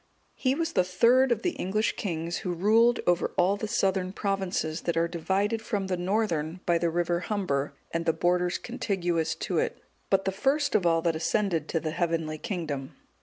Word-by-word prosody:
He 260 0 0
was 330 +1 -2
the 185 - +4
third 235 +8 +4
of 230 -1 0
the 360 - +1
English 215 - -1
kings 170 -3 -3
who 180 - -3
ruled 225 +6 +4
over 175 -1 +1
all 185 +3 +3
the 210 +1 -4
southern 190 -2 0
provinces 190 -5 -2
that 170 -1 -1
are 165 0 +3
divided 190 +6 -1
from 205 -3 -2
the 190 -1 -1
northern 180 -3 -1
by 170 -1 +3
the 170 - +1
river 175 +1 0
Humber 175 -8 -2 0.2
and 165 0 -2
the - - +6
borders 175 +2 +1
contiguous 175 -9 -1
to - - -1
it;(190) - - -2 0.3
but 195 0 +2
the 195 - +1
first 280 +8 +1
of 175 - +3
all 165 -1 +2
that 170 -2 +1
ascended 165 -1 0
to 165 - 0
the 155 -1 -3
heavenly 160 -2 -1
kingdom. 150 -9 -4
180 Hz, 190 wpm, -27 LUFS, 165-205 Hz, 0.3 s, the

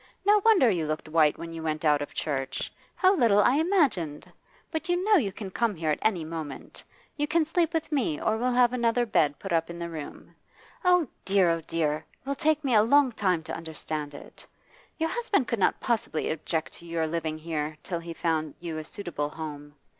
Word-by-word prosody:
No 415 +1 +5
wonder 435 - +6
you 175 -8 +1
looked 155 +1 -3
white 155 -1 +3
when 165 0 -7
you 165 - -6
went 155 0 -2
out 150 -1 +4
of 145 - -5
church. 135 -3 -3 0.2
How 380 +1 +4
little 230 - +4
I 255 +6 +4
imagined! 280 - +1 0.5
But 320 +1 -4
you 355 +1 +1
know 425 -1 +6
you 205 -8 -1
can 195 0 -7
come 230 0 0
here 160 -2 -1
at - - -1
any 185 -7 +1
moment. 160 -3 -7 0.3
You 295 0 0
can 315 +1 +2
sleep 330 +1 +1
with 325 -1 -2
me, 235 - 0
or 220 - +1
we'll 245 +3 0
have 245 0 +4
another 240 0 +2
bed 150 -9 +2
put 195 - -7
up 165 0 +1
in 170 - -7
the 170 0 -5
room. 155 -3 -8 0.5
Oh, 360 -4 +4 0.2
dear; 190 -3 +3
oh, 165 0 -1
dear! 155 -1 -1 0.2
It - - -25
will 280 - +1
take 310 +1 +1
me 265 -3 +1
a 215 - +7
long 265 +4 +4
time 185 -7 0
to - - -5
understand 155 -2 -5
it. - - -12 0.5
Your 325 0 0
husband 420 - 0
could 235 - -1
not - - +2
possibly 225 -9 -1
object 160 0 -2
to 170 - -13
your 165 -1 -1
living 160 -1 -2
here 155 -1 -3
till 170 -2 -3
he 170 0 -8
found 160 -3 -1
you 165 -2 -5
a - - -5
suitable 155 -4 -4
home. 150 -2 -8
175 Hz, 215 wpm, -27 LUFS, 155-265 Hz, 0.5 s, a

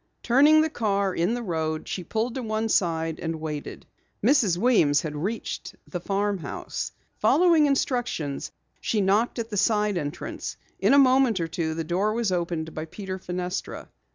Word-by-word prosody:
Turning 290 +6 +6
the 315 - +1
car 200 -6 0
in 180 +8 +1
the 245 - -4
road, 160 -4 -2
she 185 - -4
pulled 225 +7 -2
to 260 - -3
one 220 -1 -1
side 165 -5 0
and 165 -1 -3
waited. 150 -2 -6 0.4
Mrs. 230 - +4
Weems 170 - +4
had 150 -2 -4
reached 200 +10 -4
the 175 - -4
farmhouse. 195 -4 -3 0.3
Following 330 -3 +5
instructions, 240 - -1 0.3
she 220 - 0
knocked 205 +6 +2
at 230 -1 -4
the 205 - -2
side 210 -2 +2
entrance. 145 -1 -5 0.2
In - - +4
a - - +6
moment 260 -5 +5
or 165 - -1
two 160 -1 -2
the 165 - -2
door 185 +6 0
was 230 -3 0
opened 170 -3 -2
by 155 - -4
Peter 190 +2 -6
Fenestra. 180 +1 -4
195 Hz, 165 wpm, -26 LUFS, 165-230 Hz, 0.4 s, Turning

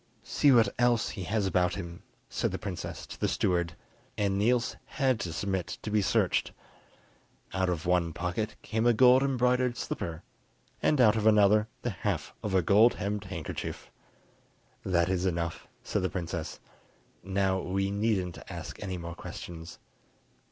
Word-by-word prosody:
"See 145 - +3
what 115 -5 +6
else 120 -2 +3
he 100 - -6
has 105 +2 0
about 90 -1 +2
him," 85 -3 -7 0.3
said - - -1
the - - -3
princess - - -6
to - - -10
the - - +1
steward, 85 -2 0 0.4
and 100 -1 +1
Niels 115 +4 +2
had 130 -4 0
to 85 - -3
submit 95 0 -2
to 105 - -4
be 105 0 +3
searched: - - +1 1.0
out 95 -1 +1
of 85 -3 -2
one 90 -2 +2
pocket 90 +6 -3
came 110 +2 0
a 120 - +6
gold 125 +3 +6
embroidered 125 -2 +2
slipper, 85 -1 -4 0.6
and 150 - +2
out 110 -4 +6
of 110 0 +1
another 105 0 +5 0.2
the 120 - -1
half 90 - -3
of 100 -3 -2
a 95 - +4
gold 105 +7 +5
hemmed 100 0 -3
handkerchief. 90 -5 -6 0.9
"That 85 -2 +2
is 95 0 0
enough," 85 -2 -3 0.2
said - - -1
the 95 - 0
princess; 85 -3 -4 0.6
"now 95 0 0
we 95 +2 -1
needn't 100 -4 0
ask - - -7
any 95 -2 -3
more 85 0 -6
questions. 85 0 -8
95 Hz, 160 wpm, -29 LUFS, 90-110 Hz, 1.0 s, what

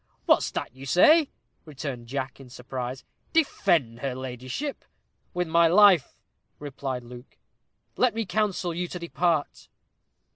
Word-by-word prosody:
"What's - - +3
that 120 - -5
you 135 +1 -10
say?" 300 - +5 0.3
returned 135 -5 -7
Jack, 135 +1 -4
in 135 -2 -13
surprise 125 +1 -6 0.3
"defend 170 - +1
her 135 -1 -3
ladyship?" 130 - -5 0.5
"With 180 -1 0
my 170 +1 +4
life," 190 -2 +5 0.4
replied 135 -3 -5
Luke. 125 +1 -13 0.6
"Let 250 -3 +2
me 225 -1 -1
counsel 190 -2 -1
you 175 +2 -3
to 180 - -6
depart." 170 -2 -1
145 Hz, 125 wpm, -26 LUFS, 130-180 Hz, 0.6 s, say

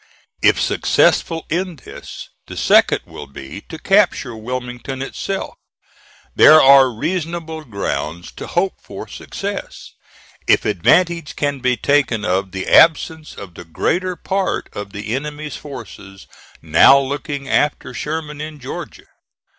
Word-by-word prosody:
If - - +4
successful 165 -1 +1
in 180 +1 -2
this, 135 - -11 0.2
the - - -9
second - - +4
will - - -10
be 70 +7 -9
to 160 - -7
capture 180 - +2
Wilmington 125 +3 -6
itself. 190 +8 -4 0.8
There 155 0 +8
are 135 -2 +7
reasonable 160 +4 -4
grounds 85 - -4
to - - -7
hope - - -1
for - - -9
success, - - -7 0.5
if - - +3
advantage 170 - +2
can 145 -1 -1
be 125 -1 +1
taken 140 -6 +1
of 95 +1 -1
the 95 0 -5
absence 160 -1 +4
of 100 -3 -10
the 85 - -10
greater 180 - -1
part 190 +2 -2
of 100 -1 -7
the 105 +2 -5
enemy's 150 +2 -5
forces 100 -8 -10 0.4
now 80 - +6
looking 140 0 -3
after 140 -2 0
Sherman 150 +2 -5
in 155 0 -7
Georgia. 130 -2 -8
140 Hz, 130 wpm, -19 LUFS, 110-160 Hz, 0.8 s, There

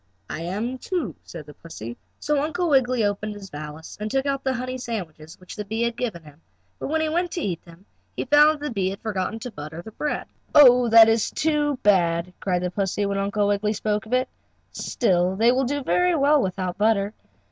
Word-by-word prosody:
"I 165 - -4
am, 215 +9 -3
too," 320 - -3
said 160 -4 -9
the 150 - -12
pussy. 120 -9 -9 0.2
So 295 -1 0
Uncle 345 +4 -1
Wiggily 255 -4 +3
opened 205 +1 -2
his 195 -2 -10
valise 150 +1 -8
and 210 +1 -3
took 270 +4 0
out 275 -1 -1
the 265 -1 0
honey 255 +1 -4
sandwiches 170 -10 -6
which 185 - -11
the 210 - -4
bee 220 +3 -2
had 235 -1 -1
given 220 -9 -4
him, 150 +1 -16 0.4
but - - -4
when 315 +3 0
he 315 - 0
went 350 +3 0
to 345 - -3
eat 180 - -3
them 170 +3 -16 0.3
he - - -2
found 295 +3 +6
that 310 -1 -2
the 295 -2 -3
bee 190 -3 0
had 195 - -7
forgotten 205 -1 -2
to 250 - -6
butter 155 0 -8
the 220 - -10
bread. 295 +7 -3 0.3
"Oh, 250 -4 +8
that 225 0 +9
is 225 -1 +2
too 295 -2 0
bad!" 175 -3 +2
cried 180 -2 -1
the 180 - -2
pussy, 200 +1 -1
when 200 0 -1
Uncle 205 +1 0
Wiggily 205 +1 +1
spoke 210 0 -2
of 235 - -6
it. 255 0 +2 0.4
"Still 185 -5 0
they 230 +4 +4
will 260 +1 +1
do 285 +2 -2
very 360 +5 +2
well 290 0 +4
without 185 -2 -3
butter." 210 -1 +2
215 Hz, 220 wpm, -24 LUFS, 185-265 Hz, 0.4 s, that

